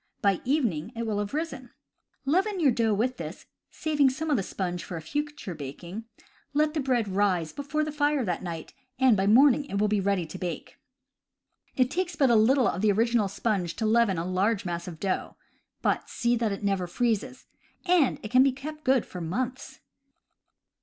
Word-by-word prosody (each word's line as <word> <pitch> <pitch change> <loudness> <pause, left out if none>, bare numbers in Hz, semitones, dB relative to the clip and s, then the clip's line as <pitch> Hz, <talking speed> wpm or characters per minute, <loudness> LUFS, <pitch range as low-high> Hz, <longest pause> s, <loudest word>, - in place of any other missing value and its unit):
By 195 -3 +2
evening 235 - 0
it 230 0 -3
will 210 -2 -1
have 205 -1 -3
risen. 305 -6 -4 0.6
Leaven 380 +7 +1
your 290 -6 +4
dough 225 -2 +1
with 250 +5 0
this - - -7 0.2
(saving 295 -3 +2
some 310 +4 -3
of - - +4
the 215 - +1
sponge 180 -2 -4
for 175 - -6
a - - -6
future 295 - -4
baking), 170 +8 -7 0.5
let 300 +1 +2
the 315 - -1
bread 255 -5 +1
rise 185 -5 0
before 295 +2 -2
the 305 - -3
fire 290 -3 +1
that 180 -3 -2
night, 170 -3 -6 0.2
and 260 -3 +5
by 195 0 +1
morning 270 +5 +5
it 200 - -4
will 210 +1 +2
be 210 0 +1
ready 195 -3 0
to 185 +4 -9
bake. 180 -2 -6 1.0
It 255 0 +2
takes 360 -1 -2
but 275 -4 +3
little 245 +4 +4
of 185 - -1
the 215 -1 +4
original 225 0 +2
sponge 200 -3 -1
to 225 - -2
leaven 220 -4 +3
a 165 - -2
large 190 +3 0
mass 170 0 -4
of 165 -3 -8
dough 190 -2 -2 0.5
(but - - 0
see 240 0 +1
that 230 -2 0
it 200 +1 -5
never 195 -3 0
freezes), 240 +5 -1 0.4
and 350 -7 +3
it 215 - -6
can 255 +1 +6
be 270 0 +5
kept 300 +4 -8
good 260 -3 +3
for 180 - -8
months. 255 +10 -4
230 Hz, 195 wpm, -27 LUFS, 190-270 Hz, 1.0 s, can